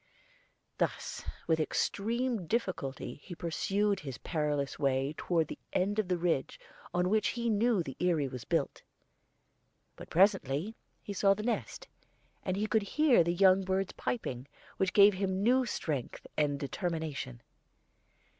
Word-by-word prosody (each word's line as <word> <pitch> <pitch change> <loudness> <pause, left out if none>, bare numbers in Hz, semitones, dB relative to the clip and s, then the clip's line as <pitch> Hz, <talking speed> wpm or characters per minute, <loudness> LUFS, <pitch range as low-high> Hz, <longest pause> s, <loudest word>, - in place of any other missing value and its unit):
Thus - - -2 0.2
with 160 -1 +2
extreme 225 +5 -1
difficulty 180 - -3
he 175 - -8
pursued 195 +4 0
his 135 -5 -6
perilous 150 -4 -2
way 135 0 +1
toward 165 -3 0
the - - -7
end 205 +3 +1
of 215 - 0
the 180 -1 +1
ridge 165 -6 -1 0.3
on 180 0 +1
which 215 +2 +2
he 235 -1 -1
knew 215 -2 +2
the 135 -4 -7
eyrie 165 -6 +2
was 125 -2 -7
built. - - -1 1.1
But - - -11
presently 185 - +2 0.3
he 205 - -5
saw 195 0 +4
the 210 - -5
nest, 240 0 -3 0.5
and 185 0 -2
could 220 - +4
hear 255 - +4
the 170 - 0
young 190 +1 +5
birds 190 0 -1
piping, 130 - -3 0.3
which 190 -2 +1
gave 205 0 +7
him 190 0 -1
new 255 +2 +4
strength 145 - -3
and 145 -2 +1
determination. 150 - -4
185 Hz, 140 wpm, -31 LUFS, 150-205 Hz, 1.1 s, gave